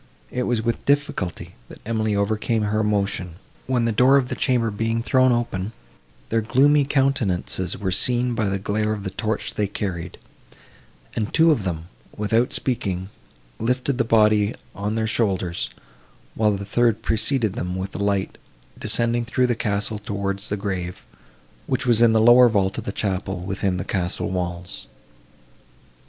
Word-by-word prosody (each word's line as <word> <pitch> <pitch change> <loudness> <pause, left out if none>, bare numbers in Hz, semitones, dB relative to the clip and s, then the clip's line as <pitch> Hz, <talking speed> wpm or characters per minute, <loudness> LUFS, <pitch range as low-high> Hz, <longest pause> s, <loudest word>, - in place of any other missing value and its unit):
It 125 - -2
was 120 -2 0
with 115 0 -2
difficulty 90 - -1 0.2
that - - -12
Emily 110 -1 0
overcame 110 +2 0
her 105 +1 0
emotion, 100 -5 -1 0.3
when, 125 -2 +1
the 115 - +1
door 125 +5 +5
of 130 -2 0
the - - -2
chamber 120 -3 +1
being 115 +2 -1
thrown 130 +1 +4
open, 115 -4 -2 0.6
their 115 0 +1
gloomy 140 +6 +4
countenances 120 - 0
were 95 -2 -2
seen 125 +5 +2
by 110 -3 0
the 100 - 0
glare 105 +2 -1
of 105 -2 -5
the 95 - -4
torch 110 +3 -3
they 105 - 0
carried, 95 -4 -5 1.0
and 110 -2 -2
two 165 0 +5
of 115 -10 0
them, 85 -2 -3 0.3
without 115 +4 +1
speaking, 95 -7 -1 0.5
lifted 125 +3 -1
the - - +4
body 105 -1 +3 0.2
on 105 +2 -3
their 110 -1 0
shoulders, 95 -6 -1 0.6
while 105 -1 +2
the 100 0 -4
third 115 +1 +1
preceding 110 0 +2
them 90 -1 -4
with 95 +1 -4
the - - -6
light, 100 -1 -1 0.4
descended 120 0 +1
through 125 +2 +1
the 125 - +2
castle 105 -1 -1
towards 100 -2 -4
the 105 - -1
grave, 95 -3 -4 0.6
which 130 +1 -1
was 120 -2 +4
in 120 -1 +6
the 110 - +3
lower 120 +2 +7
vault 100 -3 +1
of - - -7
the - - -2
chapel 95 -2 -2
within 95 0 -2
the 90 - -4
castle 90 -2 -2
walls. 90 -1 -4
110 Hz, 165 wpm, -23 LUFS, 100-120 Hz, 1.0 s, lower